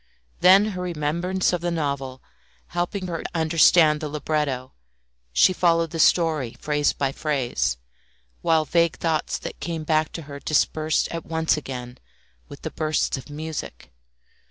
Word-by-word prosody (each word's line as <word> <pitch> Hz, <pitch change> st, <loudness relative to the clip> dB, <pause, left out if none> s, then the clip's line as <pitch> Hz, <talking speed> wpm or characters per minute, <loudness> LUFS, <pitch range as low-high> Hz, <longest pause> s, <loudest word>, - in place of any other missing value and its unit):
Then 195 Hz, +4 st, +6 dB
her 180 Hz, -, -5 dB
remembrance 175 Hz, +3 st, -1 dB
of 175 Hz, -, -1 dB
the 175 Hz, -, -1 dB
novel 140 Hz, -5 st, -3 dB, 0.5 s
helping 175 Hz, +3 st, -2 dB
her 170 Hz, -3 st, -4 dB
to -, -, -5 dB
understand 160 Hz, -1 st, +5 dB
the 155 Hz, -, -3 dB
libretto, 145 Hz, -3 st, -2 dB, 0.6 s
she 125 Hz, -, +5 dB
followed 165 Hz, -2 st, +2 dB
the 165 Hz, -, -5 dB
story 155 Hz, -9 st, +2 dB
phrase 145 Hz, -1 st, +1 dB
by 135 Hz, -1 st, -1 dB
phrase, 135 Hz, -, -1 dB, 0.6 s
while 160 Hz, -2 st, +2 dB
vague 170 Hz, 0 st, +2 dB
thoughts 160 Hz, -2 st, -1 dB
that -, -, -8 dB
came 165 Hz, -2 st, -4 dB
back 155 Hz, 0 st, +1 dB
to 165 Hz, -, -6 dB
her 140 Hz, -1 st, -9 dB
dispersed 155 Hz, +1 st, +1 dB
at 165 Hz, -1 st, -5 dB
once 160 Hz, 0 st, +1 dB
again 125 Hz, -4 st, -7 dB, 0.5 s
with -, -, -12 dB
the -, -, -4 dB
bursts 155 Hz, 0 st, 0 dB
of 135 Hz, +2 st, -9 dB
music. 155 Hz, -, -7 dB
155 Hz, 150 wpm, -24 LUFS, 145-170 Hz, 0.6 s, Then